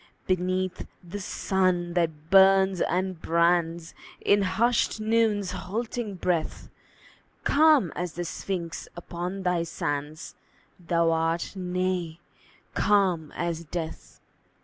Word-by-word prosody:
Beneath 185 0 -1 0.2
the 180 +4 -7
sun 185 -3 0
that 160 -2 -1
burns 195 -1 +6
and 185 -2 -1
brands 170 0 +1 0.3
In 205 0 +3
hushed 230 +4 +1
Noon's 215 -3 +1
halting 215 +3 -4
breath, 175 -3 -2 0.7
Calm 295 - +4
as 180 -2 -3
the 175 +1 -4
Sphinx 170 -1 -4
upon 175 +3 -5
thy 180 -2 +1
sands 150 -1 -4 0.5
Thou 170 -1 +1
art 165 +1 0
nay, 180 -2 -2 0.5
calm 185 -7 +2
as 170 -1 -2
death. 160 0 -6
180 Hz, 105 wpm, -26 LUFS, 170-195 Hz, 0.7 s, burns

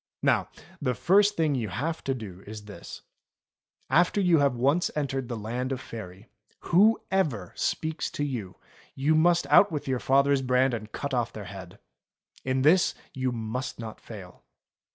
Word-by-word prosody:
Now - - +2 0.3
the 125 -3 0
first 205 - +3
thing 160 -3 +2
you 115 -6 -2
have 150 - -3
to 135 - 0
do 100 -6 -9
is 105 0 -8
this: 105 - -10 0.8
After 175 +5 +3
you 175 -5 +4
have 140 -3 +2
once 140 +8 +2
entered 135 -4 -2
the 120 - -3
Land 120 +5 -3
of 130 - -2
Faery, 105 -5 -9 0.3
whoever 185 - +2
speaks 160 0 -2
to 145 - -2
you, 115 -10 -4 0.4
you 145 +4 +2
must 170 +2 +3
out 200 - +6
with 150 -3 -4
your 130 -2 0
father's 140 +1 +3
brand 130 0 +2
and 110 -2 -5
cut 140 -1 -4
off 120 -2 0
their 105 -2 -8
head. 95 -3 -10 0.7
In 130 0 0
this 170 +5 +4 0.2
you 130 -1 -1
must 115 +2 -4
not 110 -2 -8
fail. 95 -5 -11
130 Hz, 165 wpm, -27 LUFS, 110-155 Hz, 0.8 s, out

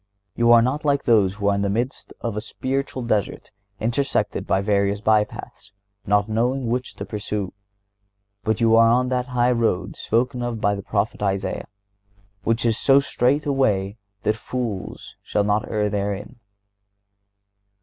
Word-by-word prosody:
You 120 0 +4
are 115 -1 +7
not 135 +5 -1
like 140 -2 +1
those 100 -5 +3
who 100 -1 -2
are 100 - +4
in 100 - 0
the 100 - 0
midst 120 +6 -2
of 115 -3 -3
a 105 - -2
spiritual 130 +2 -3
desert 110 -4 -2 0.3
intersected 120 +5 -1
by 95 - +2
various 100 0 +1
by 110 0 +4
paths, 100 -1 -11 0.4
not 105 0 +3
knowing 120 +4 0
which 125 +2 -2
to - - -6
pursue; 105 -2 -4 0.9
but 110 +1 0
you 115 -1 +4
are 115 0 +6
on 125 +2 +2
that 125 0 -1
high 125 -1 +2
road 110 -7 0
spoken 125 +2 0
of 120 -2 -3
by 100 -1 +2
the 100 - -4
prophet 105 +1 -2
Isaiah, 100 -1 -2 0.8
which 115 +2 +1
is 115 -1 +1
so 135 0 +5
"straight 140 +1 +1
a 145 - +1
way 105 -6 0 0.2
that 105 - +1
fools 110 -3 -5
shall 105 - 0
not 105 +1 0
err 105 -1 0
therein." 100 +2 -3
110 Hz, 165 wpm, -23 LUFS, 100-125 Hz, 0.9 s, are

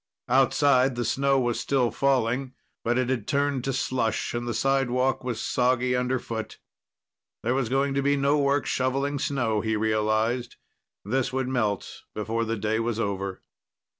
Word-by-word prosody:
Outside, 130 0 +4
the 120 0 -2
snow 135 +2 +2
was 120 -2 0
still 130 -4 +1
falling, 130 -1 +1 0.3
but 120 +1 +1
it 130 -1 +1
had 120 -5 -1
turned 140 -2 0
to 135 - 0
slush, 125 -3 -1
and 120 0 -3
the 120 - -1
sidewalk 130 +1 +1
was 120 -3 -3
soggy 125 +1 +1
underfoot. 125 -3 -2 0.9
There 120 - +1
was 130 -3 0
going 135 +1 +1
to 140 - +1
be 140 +1 +2
no 140 +2 +2
work 140 0 +2
shoveling 135 +2 0
snow, 120 -7 0
he 110 0 0
realized. 110 +3 0 0.5
This 130 +5 0
would 130 -1 -1
melt 110 -6 -2
before 115 +2 -1
the 115 0 -2
day 110 +2 0
was 115 -1 -1
over. 100 -3 -3
125 Hz, 160 wpm, -26 LUFS, 115-135 Hz, 0.9 s, Outside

